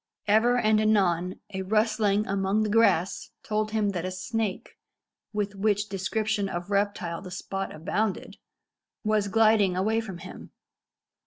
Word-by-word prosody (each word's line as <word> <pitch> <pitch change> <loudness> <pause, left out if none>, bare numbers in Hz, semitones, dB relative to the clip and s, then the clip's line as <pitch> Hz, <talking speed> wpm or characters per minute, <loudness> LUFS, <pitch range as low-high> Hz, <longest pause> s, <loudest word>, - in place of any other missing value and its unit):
Ever 225 +4 +4
and 215 -2 +3
anon 185 -5 +1
a 190 - -2
rustling 215 0 +1
among 195 +2 0
the 210 - -1
grass 205 -5 +2
told 215 0 -1
him 215 -1 0
that 180 -4 -3
a 185 - -2
snake, 195 +2 -3 0.6
with 205 -1 -2
which 205 +1 0
description 205 +1 -1
of 175 +2 -5
reptile 200 -4 -1
the 190 - -9
spot 195 +1 -4
abounded, 195 +6 -2 0.7
was 215 -1 +1
gliding 215 -3 +3
away 220 +4 +1
from 195 -5 -7
him. - - -10
205 Hz, 140 wpm, -27 LUFS, 190-215 Hz, 0.7 s, Ever